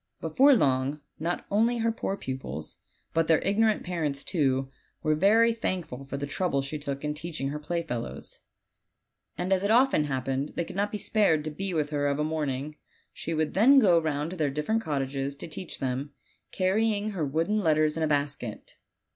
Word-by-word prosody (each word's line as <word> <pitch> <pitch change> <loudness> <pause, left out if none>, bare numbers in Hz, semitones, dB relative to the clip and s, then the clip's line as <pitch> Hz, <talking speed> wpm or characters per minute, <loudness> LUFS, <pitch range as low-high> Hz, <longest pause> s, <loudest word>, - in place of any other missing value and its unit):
Before 280 +1 +5
long 135 - +1 0.2
not 170 +3 -2
only 230 +4 +3
her 230 0 +1
poor 200 -3 -3
pupils, 80 - -6 0.3
but 165 0 +2
tkeir 160 -2 +5
ignorant 215 +2 +2
parents 155 -6 -2
too, 135 -5 0 0.3
were 155 -1 +3
very 220 +8 +4
thankful 175 - -4
for 140 +1 -5
the 140 - -3
trouble 145 -1 -1
she 150 +3 -4
took 140 -1 -5
in 150 0 -1
teaching 155 -3 -4
her 150 +1 -4
playfellows; 150 -7 -4 1.0
and 180 +2 0
as 190 0 +1
it 200 - +1
often 240 - +4
happened 135 0 -2
they 170 - -1
could - - -9
not 205 +1 0
be 210 - -2
spared 200 -8 +2
to 155 - -4
be 195 +5 -3
with 155 -3 -1
her 145 -1 0
of 140 0 0
a 150 - 0
morning, 150 -1 -2 0.4
she 165 - -4
would 155 -1 0
then 245 +9 +6
go 185 -10 +6
round 155 0 -2
to - - -5
their 155 -5 0
different 150 +11 -1
cottages 140 -3 -2
to 140 - -7
jeach 165 +3 -6
them, 135 +2 -3 0.4
carrying 210 +2 +1
her 185 -6 -2
wooden 165 +9 0
letters 155 -4 +2
in 165 - -3
a 160 - +2
basket. 140 -6 -3
155 Hz, 190 wpm, -28 LUFS, 140-195 Hz, 1.0 s, then